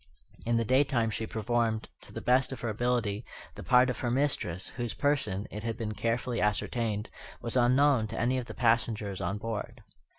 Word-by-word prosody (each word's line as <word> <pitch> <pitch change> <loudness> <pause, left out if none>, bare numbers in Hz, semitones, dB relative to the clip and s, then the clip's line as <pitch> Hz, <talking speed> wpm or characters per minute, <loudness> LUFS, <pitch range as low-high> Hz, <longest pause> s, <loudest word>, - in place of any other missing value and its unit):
In 120 0 +3
the 115 - +1
daytime 130 -2 +2
she 110 +1 -3
performed, 110 0 0
to - - -10
the - - -7
best 130 +2 +3
of 130 - -6
her 120 - -1
ability, 115 -1 0 0.3
the - - -9
part 125 0 +5
of 125 -3 -2
her 120 - -1
mistress, 120 - 0
whose 120 -2 -4
person, 135 -9 0
it 105 - -5
had 115 0 -3
been 110 -2 -3
carefully 115 +2 -1
ascertained, 105 0 -1 0.3
was 115 - -3
unknown 130 -1 +4
to - - -5
any 125 +3 +2
of 125 - -5
the - - -9
passengers 115 -4 +1
on 95 +4 -1
board. 115 +2 -5
115 Hz, 190 wpm, -30 LUFS, 110-125 Hz, 0.3 s, part